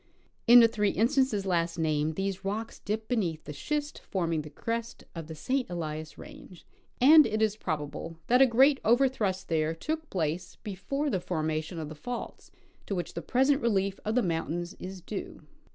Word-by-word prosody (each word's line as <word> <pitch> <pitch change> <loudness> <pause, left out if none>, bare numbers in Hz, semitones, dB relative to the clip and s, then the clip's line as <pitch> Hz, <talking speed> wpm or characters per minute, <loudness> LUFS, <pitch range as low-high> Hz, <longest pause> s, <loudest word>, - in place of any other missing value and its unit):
In 240 +1 +10
the 230 - +7
three 210 -2 0
instances 230 -2 +1
last 170 -2 0
named 155 -1 0
these 195 0 -3
rocks 215 +4 -4
dip 215 +2 -3
beneath 180 -10 -1
the 150 - -7
schist 295 - -3
forming 165 -4 -2
the 150 - -9
crest 230 +9 -4
of 165 -3 -7
the 160 - -7
St. 255 - -1
Elias 155 -2 -5
range, 180 - -12 0.3
and 300 +4 +8
it 215 0 -1
is 215 -1 +2
probable 155 -3 -4
that 250 +2 +4
a 270 - +8
great 265 +4 +5
overthrust 230 -6 +2
there 160 -1 0
took 315 - -4
place 170 0 -2
before 275 +9 -2
the 190 - 0
formation 160 -1 -2
of 160 -2 -4
the 155 - -7
faults 235 +11 -7 0.4
to 200 - -2
Avhich 175 - -4
the - - -4
present 270 +3 +2
relief 195 -4 0
of 215 +2 -1
the 250 - +3
mountains 170 +1 -2
is 185 0 -7
due. 195 +3 -6
195 Hz, 180 wpm, -29 LUFS, 165-235 Hz, 0.4 s, In